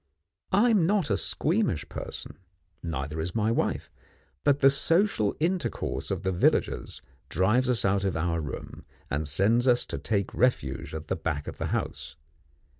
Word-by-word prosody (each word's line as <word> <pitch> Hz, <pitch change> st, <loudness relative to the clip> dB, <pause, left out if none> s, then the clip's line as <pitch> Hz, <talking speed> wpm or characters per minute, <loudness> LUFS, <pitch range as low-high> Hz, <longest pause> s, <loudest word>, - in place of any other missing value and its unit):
I 220 Hz, +5 st, +4 dB
am 190 Hz, -7 st, +4 dB
not 195 Hz, -5 st, +1 dB
a -, -, +4 dB
squeamish 155 Hz, -, 0 dB
person, -, -, -7 dB, 0.4 s
neither 75 Hz, -1 st, -4 dB
is 85 Hz, +3 st, -4 dB
my 110 Hz, 0 st, +2 dB
wife, -, -, -1 dB, 0.5 s
but 145 Hz, -1 st, +4 dB
the 135 Hz, -1 st, +6 dB
social 165 Hz, -, +2 dB
intercourse 175 Hz, +3 st, -1 dB
of -, -, -2 dB
the 95 Hz, -, +1 dB
villagers 90 Hz, -, 0 dB, 0.3 s
drives 115 Hz, +8 st, +2 dB
us 120 Hz, -4 st, +2 dB
out 100 Hz, 0 st, +2 dB
of 95 Hz, -4 st, 0 dB
our 85 Hz, 0 st, 0 dB
room, 75 Hz, -, -7 dB, 0.3 s
and 75 Hz, +1 st, -1 dB
sends 105 Hz, -, +2 dB
us 120 Hz, -1 st, +4 dB
to -, -, -5 dB
take 100 Hz, -4 st, -1 dB
refuge 70 Hz, -, 0 dB
at 80 Hz, 0 st, -6 dB
the 95 Hz, -, 0 dB
back 80 Hz, -4 st, -3 dB
of -, -, -7 dB
the -, -, -1 dB
house. -, -, -3 dB
100 Hz, 165 wpm, -27 LUFS, -, 0.5 s, the